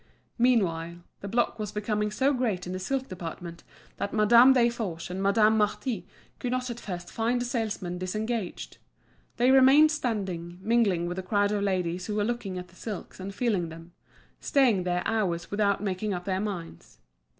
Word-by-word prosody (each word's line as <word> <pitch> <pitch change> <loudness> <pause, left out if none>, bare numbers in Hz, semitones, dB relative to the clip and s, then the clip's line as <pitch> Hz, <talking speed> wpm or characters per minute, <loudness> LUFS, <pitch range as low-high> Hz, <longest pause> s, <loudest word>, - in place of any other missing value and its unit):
Meanwhile, 175 -9 +2 0.2
the 200 - -7
block 230 +2 0
was 210 -2 -3
becoming 210 0 -1
so 265 +7 +1
great 225 -8 -1
in 180 - -5
the 185 - -3
silk 265 +7 -2
department 170 -1 -7 0.3
that 200 - -3
Madame 235 +4 +7
Desforges 230 -9 0
and 185 +1 -3
Madame 215 +2 +4
Marty 210 -1 -1 0.3
could 245 - -3
not 255 -1 -1
at 235 - -7
first 175 -5 -6
find 235 +2 0
a 245 - -2
salesman 210 -7 -3
disengaged. 215 +2 -4 0.6
They 245 +2 +4
remained 270 +4 +7
standing, 190 - -3
mingling 210 -6 +2
with 175 +1 -4
the - - -1
crowd 205 +2 +1
of 205 -1 0
ladies 180 -2 -1
who 210 - -2
were 210 - +1
looking 220 -5 -3
at 180 0 -7
the 175 - -21
silks 205 -1 -7
and 190 +1 -5
feeling 200 -5 0
them, 165 +1 -11 0.5
staying 235 -10 +2
there 180 0 0
hours 190 -7 -1
without 205 -1 +1
making 195 +1 -2
up 175 0 -6
their 190 -1 -1
minds. 180 - -6
205 Hz, 175 wpm, -27 LUFS, 180-235 Hz, 0.6 s, Madame